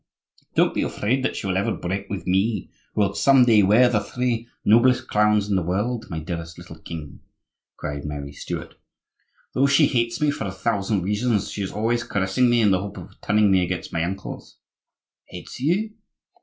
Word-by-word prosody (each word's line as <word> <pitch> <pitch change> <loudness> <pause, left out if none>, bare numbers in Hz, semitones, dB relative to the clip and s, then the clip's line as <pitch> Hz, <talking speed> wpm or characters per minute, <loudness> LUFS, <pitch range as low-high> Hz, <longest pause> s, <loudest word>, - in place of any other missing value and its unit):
"Don't - - +3
be - - -1
afraid 130 +6 -1
that - - -1
she - - -5
will 95 -1 0
ever 100 - 0
break 95 +3 -4
with 100 -2 -5
me, 95 +5 0 0.2
who - - +2
will 100 -1 +1
some 135 0 +5
day 110 -3 +5
wear 105 +6 +5
the 120 -3 +2
three 120 +2 -2 0.2
noblest 120 +4 +4
crowns 105 -1 +2
in 100 - 0
the 95 - +2
world, 105 +7 -2
my 80 - -4
dearest 85 0 -6
little 85 -2 -11
king," 80 -2 -8 0.6
cried 70 -1 -5
Mary 70 -1 -5
Stuart. - - -6 0.8
"Though 135 +2 +3
she 140 +2 +5
hates 115 -4 0
me 150 -1 +2
for 125 - -4
a 95 - -3
thousand 100 -1 -1
reasons 105 +2 0
she 105 - -5
is 95 - -3
always 115 +2 0
caressing 100 +6 +1
me 120 -1 +3
in 105 -3 +4
the 95 -1 +2
hope 100 0 -7
of - - -12
turning 105 -1 +3
me 95 -1 +4
against 90 0 -4
my 80 -1 0
uncles." 95 +3 -6 0.7
"Hates - - -9
you!" 180 - 0
105 Hz, 195 wpm, -23 LUFS, 95-120 Hz, 0.8 s, some